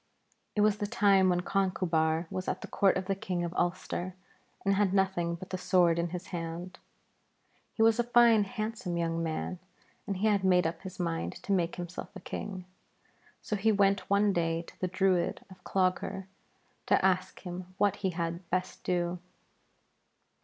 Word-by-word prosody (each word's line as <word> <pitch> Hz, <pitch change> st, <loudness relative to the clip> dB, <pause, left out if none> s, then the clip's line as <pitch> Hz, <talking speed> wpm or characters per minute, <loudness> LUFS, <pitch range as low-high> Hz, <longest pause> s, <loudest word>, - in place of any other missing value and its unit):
It 210 Hz, -, +2 dB
was 210 Hz, 0 st, +4 dB
the 205 Hz, -, -2 dB
time 200 Hz, -4 st, +4 dB
when 175 Hz, 0 st, +2 dB
Conchubar 175 Hz, -4 st, +1 dB
was 185 Hz, -, -4 dB
at 185 Hz, -, -2 dB
the -, -, -6 dB
court 195 Hz, -2 st, +3 dB
of 190 Hz, -, -3 dB
the 195 Hz, -, 0 dB
King 185 Hz, -3 st, -3 dB
of 170 Hz, 0 st, -3 dB
Ulster, 180 Hz, 0 st, -2 dB, 0.5 s
and 195 Hz, -, +4 dB
had 195 Hz, -1 st, +2 dB
nothing 190 Hz, -3 st, +1 dB
but 185 Hz, +2 st, -10 dB
the 185 Hz, -, -2 dB
sword 175 Hz, -3 st, +3 dB
in 170 Hz, 0 st, 0 dB
his 180 Hz, +1 st, -6 dB
hand. 170 Hz, +2 st, -5 dB, 1.0 s
He 225 Hz, -, +3 dB
was 225 Hz, +1 st, +4 dB
a -, -, +4 dB
fine 235 Hz, -3 st, +5 dB
handsome 215 Hz, -4 st, -3 dB
young 165 Hz, 0 st, -1 dB
man, 165 Hz, +2 st, -3 dB, 0.5 s
and 195 Hz, -, -2 dB
he 200 Hz, -, -1 dB
had 205 Hz, -3 st, +3 dB
made 180 Hz, -2 st, +4 dB
up 165 Hz, 0 st, -2 dB
his 190 Hz, -1 st, -9 dB
mind 165 Hz, -2 st, -2 dB
to -, -, -4 dB
make 175 Hz, -3 st, +1 dB
himself 175 Hz, 0 st, -6 dB
a -, -, -6 dB
king. 185 Hz, 0 st, -6 dB, 0.8 s
So 210 Hz, -, -2 dB
he 215 Hz, +2 st, +2 dB
went 200 Hz, -1 st, +2 dB
one 200 Hz, 0 st, +3 dB
day 165 Hz, -1 st, 0 dB
to -, -, -16 dB
the 185 Hz, -, +1 dB
Druid 185 Hz, -1 st, +1 dB
of 185 Hz, -, -15 dB
Clogher 190 Hz, 0 st, 0 dB, 0.6 s
to -, -, +3 dB
ask 185 Hz, -1 st, +1 dB
him 180 Hz, 0 st, -7 dB
what 205 Hz, -2 st, +2 dB
he 195 Hz, -, -1 dB
had 170 Hz, 0 st, -4 dB
best 185 Hz, +1 st, -2 dB
do. 175 Hz, 0 st, -1 dB
185 Hz, 180 wpm, -30 LUFS, 175-195 Hz, 1.0 s, fine